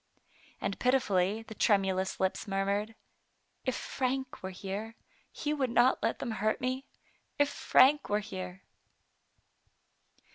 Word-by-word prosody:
And 200 - -3
pitifully 215 -5 +2
the 225 - -9
tremulous 190 -3 +1
lips 190 +3 -1
murmured, 200 +3 -1 0.4
" - - -44
If 260 - +1
Frank 265 0 -2
were 190 - -4
here, 200 +4 -5 0.4
he 300 -1 -2
would 270 -4 0
not 240 +2 +4
let - - 0
them 235 - -4
hurt 215 0 0
me; 255 +2 -2 0.5
if 290 0 +3
Frank 285 +3 +4
were 205 - +3
here!" 185 -2 -6
215 Hz, 130 wpm, -31 LUFS, 195-255 Hz, 0.5 s, not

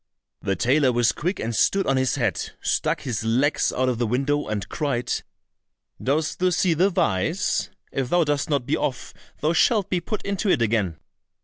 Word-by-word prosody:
The 95 - -1
tailor 130 - +3
was 120 0 +3
quick 180 +6 -3
and 115 +1 -2
stood 195 - +2
on 135 - +2
his 130 -1 +1
head, - - -1
stuck - - 0
his 115 -4 -3
legs 125 +7 +2
out 130 0 0
of 125 -2 0
the 120 - +1
window, 140 +5 0
and 105 -2 -3
cried, 140 -6 -2 0.9
"Dost 155 +4 0
thou 185 0 +3
see 180 0 +2
the 180 +5 +3
vise? 170 - 0 0.2
If 130 -2 -2
thou 175 +2 +3
dost 145 -1 -1
not 140 -5 0
be 140 - +1
off 130 -4 -3 0.3
thou 155 +2 +2
shalt 205 +2 +2
be 180 -2 +1
put 210 +4 -4
into 200 0 -1
it 150 - +3
again." 105 -7 0
140 Hz, 190 wpm, -24 LUFS, 120-170 Hz, 0.9 s, tailor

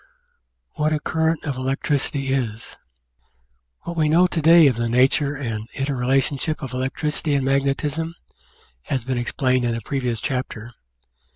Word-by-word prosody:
What 155 0 +1
a 150 - 0
Current 160 +1 0
of 140 -4 -3
Electricity 135 +1 -1
is 115 -4 -3 1.1
What 170 - -5
we 155 -2 +2
know 170 +4 +5
to 175 -2 -1
day 165 +1 +7
of 135 -4 +4
the 115 0 -1
nature 135 +4 +2
and 115 -5 -4
inter 140 +1 -2
relationship 135 +5 0
of 130 - -6
electricity 145 +3 -1
and 135 -2 0
magnetism 140 +4 0 0.7
has 130 -4 -2
been 130 -1 -1
explained 130 +1 0
in 120 -1 0
a 115 - -4
previous 125 -1 -2
chapter. 125 -3 -4
135 Hz, 150 wpm, -22 LUFS, 125-150 Hz, 1.1 s, day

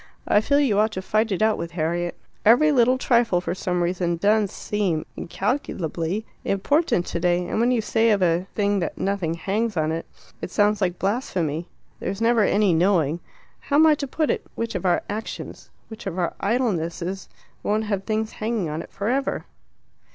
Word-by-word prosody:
I 210 - +4
feel 285 +5 +2
you 235 -8 +3
ought 215 0 +2
to 185 - -3
fight 215 +2 +1
it 195 +2 +1
out 220 0 +2
with 170 0 -5
Harriet. 170 +1 -1 0.3
Every 260 +8 +6
little 255 -1 +4
trifle, 235 -8 +2
for 175 - -3
some 180 -1 -1
reason, 175 -1 0
does 205 +2 +3
seem 190 -7 -1
incalculably 190 - -2 0.2
important 200 - +1
today, 175 +1 0
and 215 - -2
when 235 +2 +3
you 245 -3 +2
say 225 +1 +2
of 205 -3 +3
a 175 +2 +1
thing 205 -1 +1
that 170 - -3
'nothing 190 -4 -1
hangs 205 +4 -1
on 155 0 +1
it,' 165 +1 -4 0.3
it - - -4
sounds 210 +2 +2
like 180 -2 0
blasphemy. 180 - -1 0.3
There's 195 +2 -3
never 230 0 +3
any 200 -2 +3
knowing 165 -2 +2 0.4
(how 285 - -2
am 310 +2 +7
I 315 - +7
to 285 -1 -3
put 310 +3 0
it?) - - -2
which 230 0 -3
of 185 -1 -1
our 175 - +2
actions, 215 +2 -6 0.2
which 220 -1 -9
of 185 -2 -4
our 175 -2 0
idlenesses 195 -5 -1 0.3
won't 215 +1 0
have 200 -3 -2
things 220 +1 -1
hanging 215 -6 -2
on 155 +2 -3
it - - -12
for 200 - -4
ever." 270 +3 -1
200 Hz, 190 wpm, -24 LUFS, 175-225 Hz, 0.4 s, am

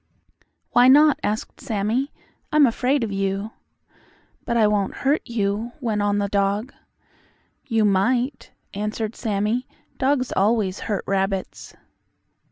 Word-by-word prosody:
"Why 245 +1 +6
not?" 295 +2 +6
asked 210 +1 -3
Sammie. 235 +3 -1 0.4
"I'm 300 -1 +6
afraid 255 +2 +1
of 220 - -3
you." 195 +2 -2 0.9
"But 235 -1 0
I 220 - +5
won't 205 -2 0
hurt 285 +3 +3
you," 225 0 -2
went 220 -6 -1
on 205 0 +1
the 200 0 0
dog. 200 +5 -1 0.9
"You 225 -4 +2
might," 240 +7 +1 0.2
answered 210 +2 -3
Sammie. 215 +4 -1 0.3
"Dogs 265 -1 +1
always 205 -1 +1
hurt 205 - -1
rabbits." 195 0 -2
215 Hz, 120 wpm, -23 LUFS, 200-250 Hz, 0.9 s, Why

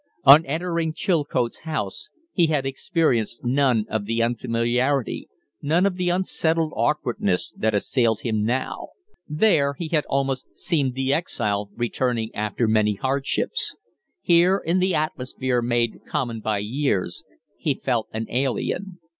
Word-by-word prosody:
On 145 +4 +9
entering 165 +1 -1
Chilcote's 145 -9 0
house 155 - -4 0.2
he 170 -4 +3
had 150 -4 0
experienced 135 - 0
none 125 -3 +2
of 110 -2 -2
the 115 +2 0
unfamiliarity, 120 +3 0 0.3
none 165 +6 +2
of 200 - +2
the 180 -1 0
unsettled 165 -3 +1
awkwardness, 115 -10 0
that 110 -1 0
assailed 115 +1 +1
him 110 -3 -1
now. 125 +4 -2 0.4
There 150 -4 +2
he 165 -3 -4
had 155 -2 +1
almost 135 -1 -1
seemed 140 -6 0
the 135 +1 +1
exile 105 - -1
returning 120 -1 -1
after 105 +2 -1
many 110 -1 +2
hardships; 135 +5 -1 0.5
here, 175 +3 +5
in 180 0 0
the 185 0 +2
atmosphere 130 -5 -1
made 120 -1 0
common 115 -3 -2
by 110 -1 -1
years, 110 -7 -1 0.4
he - - 0
felt 120 -4 -1
an 110 +1 -3
alien. 140 +9 -1
130 Hz, 135 wpm, -23 LUFS, 115-160 Hz, 0.5 s, On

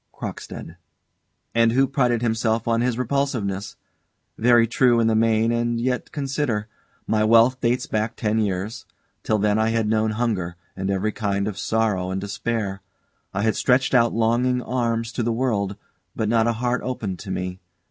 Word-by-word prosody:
CROCKSTEAD. 80 - -7 0.8
And 115 0 +3
who 135 +2 +4
prided 125 -4 +1
himself 115 0 0
on 115 0 +2
his 125 -1 0
repulsiveness. 120 -7 -1 0.6
Very 120 0 +5
true, 120 0 +3
in 115 - +3
the 115 - +3
main, 110 0 +3
and 120 0 0
yet 125 +1 -2
consider! 135 -7 -2 0.4
My 110 -1 +1
wealth 115 +4 +5
dates 120 +1 +1
back 110 +1 -2
ten 110 -1 0
years; 100 +1 -2 0.3
till 110 - +1
then 105 +1 +2
I 110 0 +2
had 115 -1 0
known 110 0 +1
hunger, 105 -7 -1 0.2
and 95 +1 -3
every 100 +2 0
kind 100 -2 -1
of 100 -2 -4
sorrow 105 -5 0
and 95 +1 -2
despair. 100 0 -3 0.5
I 100 - -2
had 110 -1 +2
stretched 125 +1 +2
out 120 -2 +4
longing 120 +2 +1
arms 115 -2 -1
to 120 - -3
the 115 0 0
world, 110 -5 0 0.4
but 110 - -1
not 115 +1 +3
a 115 - +2
heart 120 +2 -1
opened 105 -8 -4
to 100 - -9
me. 90 0 -3
115 Hz, 170 wpm, -23 LUFS, 105-120 Hz, 0.8 s, Very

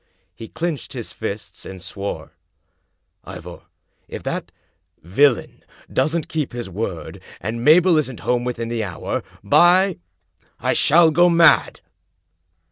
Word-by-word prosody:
He 115 - -10
clinched 160 0 -4
his 120 -4 -7
fists, 110 -1 -6
and 95 -1 -9
swore: 100 +3 -6 0.5
" - - -51
Ivor, - - -10 0.5
if - - -8
that - - -4 0.5
villain 120 - +1 0.3
doesn't 155 +4 0
keep 150 -5 -3
his 120 -5 -6
word, 95 -3 -5 0.2
and 115 +5 -4
Mabel 165 +3 +5
isn't 130 -5 -4
home 120 -1 0
within 120 -2 -4
the 115 -2 -2
hour, 95 -5 -4 0.2
by 180 - +4 0.6
1 - - 0
shall 165 +1 +5
go 175 +3 +4
mad! 170 -1 +4
125 Hz, 125 wpm, -21 LUFS, 110-165 Hz, 0.6 s, Mabel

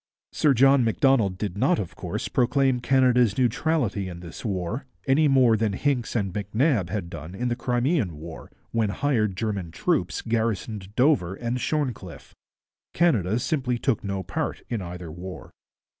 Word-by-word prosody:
Sir 145 -3 +3
John 135 +1 +5
Macdonald 115 -4 +2
did 100 -1 -4
not, - - +3
of 95 -5 -5
course, - - -4
proclaim 130 +1 +2
Canada's 125 -4 +3
neutrality 120 - 0
in 85 -1 -8
this 85 -2 -10
war, 105 +6 -3 0.2
any 145 +3 +4
more 130 -5 +5
than 110 -2 0
Hincks 125 +2 -1
and 100 -5 -1
MacNab 105 - 0
had 100 -4 -3
done 80 +2 -8
in 125 +5 -2
the 120 - 0
Crimean 120 - 0
War, 80 +1 -10 0.2
when 115 -2 +1
hired 105 -3 0
German 100 -5 -2
troops - - -1
garrisoned 110 -3 -2
Dover 125 - +3
and 120 +3 -3
Shorncliffe. 125 - -3 0.6
Canada 115 - +2
simply 125 -1 -1
took 120 -2 0
no 100 -1 -3
part - - -3
in 115 -4 -2
either 90 -2 -7
war. 90 +3 -9
115 Hz, 155 wpm, -25 LUFS, 95-130 Hz, 0.6 s, John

